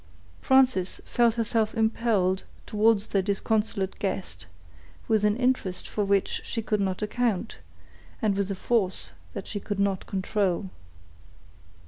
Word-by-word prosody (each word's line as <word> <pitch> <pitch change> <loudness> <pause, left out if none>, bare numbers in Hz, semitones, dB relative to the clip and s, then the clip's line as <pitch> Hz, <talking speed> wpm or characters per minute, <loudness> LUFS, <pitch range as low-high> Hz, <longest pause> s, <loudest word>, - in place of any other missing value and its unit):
Frances 255 -9 +3
felt 235 -2 +2
herself 225 -1 0
impelled 220 -4 +1 0.2
towards 215 -1 +3
their 195 - +1
disconsolate 200 0 -1
guest, 175 - -4 0.6
with 215 -2 +2
an 210 0 +3
interest 250 -8 0
for 210 - -1
which 200 -1 +1
she 225 - -3
could 210 -1 0
not 190 +1 -1
account, 225 -1 -1 0.6
and 215 -5 +1
with 200 0 -1
a 195 - -2
force 195 -2 0 0.2
that - - -5
she 205 - -4
could 200 0 -4
not 200 -2 0
control. 190 -1 -1
205 Hz, 130 wpm, -27 LUFS, 195-225 Hz, 0.6 s, Frances